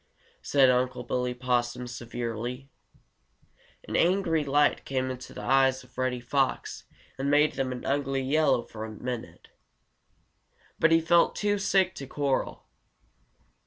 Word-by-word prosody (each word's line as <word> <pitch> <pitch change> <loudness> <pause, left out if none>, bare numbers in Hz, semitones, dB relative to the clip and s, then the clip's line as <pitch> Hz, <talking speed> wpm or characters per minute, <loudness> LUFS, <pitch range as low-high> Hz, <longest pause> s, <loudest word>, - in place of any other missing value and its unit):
said 135 -2 +4
Unc' 125 0 -1
Billy 125 0 -1
Possum 125 0 -1
severely. 120 +2 -5 1.2
An - - -4
angry 170 -3 +2
light 145 +1 +2
came 130 -1 -2
into 130 0 -8
the - - -8
eyes 135 -1 +3
of 125 - -21
Reddy 130 -1 -1
Fox 135 +2 -1 0.3
and 140 +1 -1
made 150 +1 +4
them 135 -1 -2
an 125 -1 -6
ugly 135 -1 0
yellow 145 -2 +2
for 110 0 -8
just 110 - -11
a - - -14
minute. 125 -2 -6 1.3
But 165 - +4
he 165 0 +5
felt 170 +1 +3
too 205 -1 0
sick 190 -1 +2
to 135 - -8
quarrel. 140 -1 -2
130 Hz, 140 wpm, -27 LUFS, 125-145 Hz, 1.3 s, he